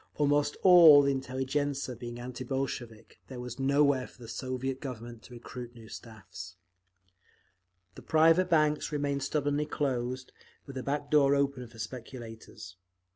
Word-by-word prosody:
Almost 145 0 +1
all 170 -6 +9
the 140 - +2
intelligentzia 135 +1 -2
being 120 0 -8
anti 125 +1 -6
Bolshevik, 120 -4 -5
there 130 -2 -8
was 125 +1 -7
nowhere 140 -1 +2
for - - -20
the - - -10
Soviet 130 +2 -4
Government 120 -3 -7
to 125 - -14
recruit 120 0 -9
new 115 -2 -13
staffs…. 95 -5 -10 1.4
The - - -12
private 165 +3 +4
banks 155 -3 +2
remained 140 -1 -1
stubbornly 145 +1 -1
closed, 130 -3 -2 0.3
with 140 - -10
a - - -4
back 145 +2 -3
door 140 -2 +5
open 140 -3 -1
for 115 - -17
speculators. 115 -5 -9
130 Hz, 140 wpm, -30 LUFS, 120-145 Hz, 1.4 s, all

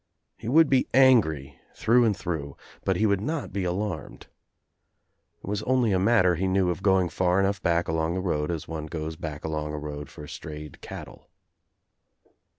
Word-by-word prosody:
He 110 - -9
would 155 +6 +5
be 135 -2 +2
angry 80 - +4 0.2
through 120 +2 +4
and 105 -4 +1
through, 80 -7 -4 0.3
but - - +1
he 110 - +2
would 100 -2 +2
not 150 - -3
be 95 -2 -1
alarmed. 90 -2 -4 1.2
It - - -10
was 100 0 -1
only 125 -3 +2
a 95 - +2
matter, 95 -3 +4
he 95 +3 -1
knew, 95 -1 +2
of 90 - -5
going 95 -2 +3
far 90 +2 +1
enough 100 0 +1
back 85 -1 +1
along 80 +1 0
the - - -1
road 75 -5 -1
as 85 -3 -3
one 80 -1 -5
goes 80 0 -5
back 75 -2 -6
along 75 -1 -3
a - - -4
road 75 -1 -6
for 75 - -10
strayed 75 0 -9
cattle. - - -10
90 Hz, 180 wpm, -26 LUFS, 80-105 Hz, 1.2 s, would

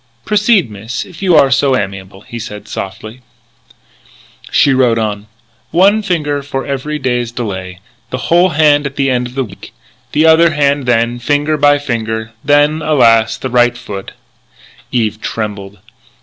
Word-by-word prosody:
"Proceed 210 - +2
miss, 110 +3 -5
if 180 -3 -14
you 185 -3 +3
are 140 -3 +5
so 135 -1 +3
amiable," 95 -1 -6
he 120 +2 -8
said 105 -2 -8
softly. 110 +5 -7 1.3
She 140 - +3
wrote 125 -3 +2
on: 105 -2 -3 0.2
" - - -39 0.2
One 210 +2 +3
finger 150 -7 -1
for 135 -1 -4
every 140 +2 -3
day's 125 -4 -2
delay. 95 -6 -6 0.3
The 130 - -3
whole 175 +7 +3
hand 150 -3 +3
at 140 - -10
the 135 - 0
week's 125 +1 -2 0.3
end. - - -18 0.4
The 155 +2 +3
other 160 0 +5
hand 140 -2 +1
then, 120 0 +1
finger 145 +4 0
by 145 -1 +4
finger. 110 -5 -3
Then, 145 +2 +3
alas! 120 -7 +3
the 130 - -5
right 120 0 +3
foot 100 -4 -8 0.4
" - - -26
Eve 110 -3 -1
trembled. 100 -2 -5
130 Hz, 155 wpm, -14 LUFS, 110-145 Hz, 1.3 s, are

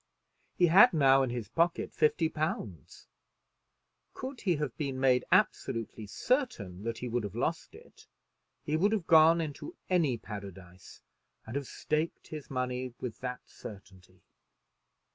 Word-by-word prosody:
He 180 - +5
had 195 +7 +7
now 135 -2 +5
in 130 - 0
his 120 -3 -4
pocket 170 - 0
fifty 160 +1 +2
pounds. 135 - -5 1.1
Could 260 -1 -7
he 180 -4 +1
have 145 -6 -3
been 135 -2 -3
made 130 -1 +3
absolutely 110 -1 0
certain 100 - -1
that 115 -1 -2
he 125 - -5
would 120 -1 -1
have 100 - -6
lost - - -2
it, - - -17 0.6
he 150 - -1
would 200 +7 +2
have 200 -6 -1
gone 165 0 +6
into 165 - -5 0.2
any 155 -9 +2
paradise 95 -4 -10 0.4
and 110 - -8
have 140 -2 -3
staked 155 +2 -3
his 155 -2 -8
money 125 -1 -3
with 120 -3 -6
that 125 0 -5
certainty. 95 -3 -13
130 Hz, 145 wpm, -30 LUFS, 110-160 Hz, 1.1 s, had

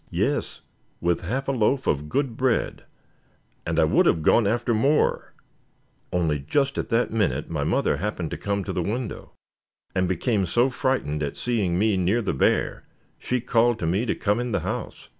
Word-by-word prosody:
"Yes, - - -1 0.4
with 85 0 0
half 130 +10 -3
a - - +2
loaf 130 +2 +1
of 75 +1 -1
good 130 - -1
bread; 125 -1 0 0.8
and - - -1
I - - +5
would - - +3
have 80 - +2
gone 110 +6 +4
after 120 +2 +1
more 140 +7 +1 0.8
only 80 -4 0
just 135 - 0
at - - -3
that 115 -1 +1
minute 95 - 0
my 75 -3 -1
mother 70 - +1
happened 90 -2 -3
to - - -2
come 100 -1 -2
to - - -4
the 90 - -1
window, 110 +6 -4 0.6
and 95 -1 +1
became 95 +1 0
so 120 +8 +2
frightened 125 - -1
at 70 -2 -3
seeing 105 -8 0
me 105 0 +2
near 95 +6 +1
the 100 - -1
bear, 65 - 0 0.3
she 125 -1 -1
called 120 -1 +2
to 105 - -3
me 95 +9 0
to - - 0
come 105 +3 0
in 120 -2 -3
the - - 0
house. - - -5
105 Hz, 185 wpm, -24 LUFS, 85-120 Hz, 0.8 s, I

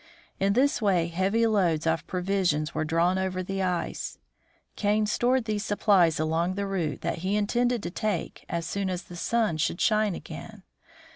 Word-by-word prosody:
In 195 +1 +2
this 265 +3 +2
way 180 -5 +2
heavy 195 +7 +1
loads 180 -8 +2
of 160 -1 0
provisions 180 -4 0
were - - -1
drawn 170 +4 +2
over 185 -1 -2
the 195 +1 -3
ice. 180 -2 -2 0.6
Kane 210 +1 +1
stored 245 +3 +1
these 210 -2 -1
supplies 195 -6 +3
along 165 +3 0
the 200 0 -2
route 180 -6 -2
that - - -2
he 190 +4 -1
intended 240 +3 +1
to - - -4
take 205 -2 -3
as 170 -1 -2
soon 195 +2 -2
as 180 0 -3
the 175 - -11
sun 220 -2 0
should 170 +2 -1
shine 215 -4 +2
again. 190 +5 -9
190 Hz, 170 wpm, -27 LUFS, 170-210 Hz, 0.6 s, supplies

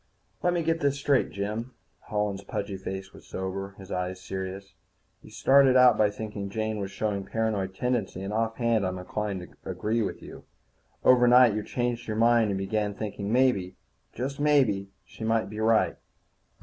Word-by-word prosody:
_ - - -42 0.4
"Let 175 0 +3
me 170 -1 0
get 165 +1 +1
this 140 -2 +1
straight, 140 -1 +2
Jim." 110 +5 -4 0.3
Holland's 105 -2 -2
pudgy 100 0 -4
face 95 0 -6
was - - -15
sober, 95 +1 -5
his 95 -1 -11
eyes 90 0 -3
serious. 95 +1 -6 0.5
"You - - -14
started 135 -1 +5
out 125 -1 +7
by 105 -1 +3
thinking 105 -1 -6
Jean 110 +1 -2
was 100 -1 -3
showing 100 -1 -2
paranoid 105 -4 -2
tendencies, 115 -5 -1
and 100 +2 -4
offhand 115 0 +1
I'm 95 0 -2
inclined 100 +1 -3
to 90 - -12
agree 105 +5 -1
with 100 - -4
you. - - -11 0.6
Overnight 125 -2 +6
you 105 - -1
changed 120 0 -2
your 110 -1 -2
mind 115 -1 +4
and 100 - -1
began 100 +1 -1
thinking 100 -2 -5
that 105 - -1
maybe, 120 -8 +2 0.4
just 135 +4 -4
maybe, 130 -10 +2 0.2
she 110 - -10
might 110 -2 0
be 105 - -6
right. 110 0 +3
105 Hz, 175 wpm, -27 LUFS, 95-120 Hz, 0.6 s, out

